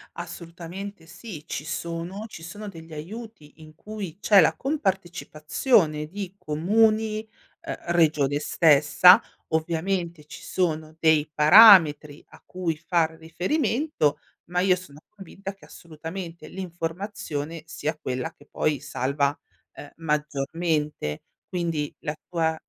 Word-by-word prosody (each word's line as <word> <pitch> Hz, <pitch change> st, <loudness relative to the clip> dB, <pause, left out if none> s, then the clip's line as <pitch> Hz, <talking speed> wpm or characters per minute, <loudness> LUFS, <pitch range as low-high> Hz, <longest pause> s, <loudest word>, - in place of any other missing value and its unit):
Assolutamente 175 Hz, +2 st, -8 dB
sì, 165 Hz, -2 st, -9 dB
ci 150 Hz, -, -4 dB
sono 170 Hz, +6 st, -4 dB
ci 165 Hz, -6 st, -11 dB
sono 205 Hz, +6 st, -8 dB
degli 165 Hz, -4 st, -10 dB
aiuti 180 Hz, 0 st, -9 dB
in 155 Hz, 0 st, -14 dB
cui 200 Hz, -1 st, -8 dB
c'è 205 Hz, -2 st, +6 dB
la -, -, +3 dB
compartecipazione 175 Hz, -, 0 dB
di 195 Hz, +2 st, -7 dB
comuni, 215 Hz, +7 st, +1 dB, 0.3 s
ehm, -, -, -5 dB
regione 155 Hz, -5 st, +2 dB
stessa. 155 Hz, +5 st, +6 dB, 0.3 s
Ovviamente 170 Hz, 0 st, -2 dB
ci 150 Hz, -, -11 dB
sono 160 Hz, -3 st, -2 dB
dei 160 Hz, -2 st, +4 dB
parametri 155 Hz, -3 st, +7 dB
a -, -, -17 dB
cui 180 Hz, -3 st, -3 dB
far 165 Hz, 0 st, +1 dB
riferimento 180 Hz, -, 0 dB, 0.3 s
ma 180 Hz, +1 st, -2 dB
io 185 Hz, 0 st, +4 dB
sono 160 Hz, -6 st, -12 dB
convinta 195 Hz, -1 st, -9 dB
che 195 Hz, -, -18 dB
assolutamente 165 Hz, 0 st, -8 dB
l'informazione 170 Hz, -3 st, -5 dB
sia 155 Hz, -1 st, -4 dB
quella 130 Hz, -3 st, -3 dB
che -, -, -20 dB
poi 150 Hz, -3 st, -1 dB
salva, 140 Hz, 0 st, -1 dB, 0.4 s
ehm, 145 Hz, -, -11 dB
maggiormente. 150 Hz, -, -2 dB, 0.2 s
Quindi 165 Hz, -5 st, -2 dB
la 150 Hz, -, -3 dB, 0.2 s
tua 160 Hz, -2 st, 0 dB
165 Hz, 115 wpm, -25 LUFS, 150-190 Hz, 0.4 s, parametri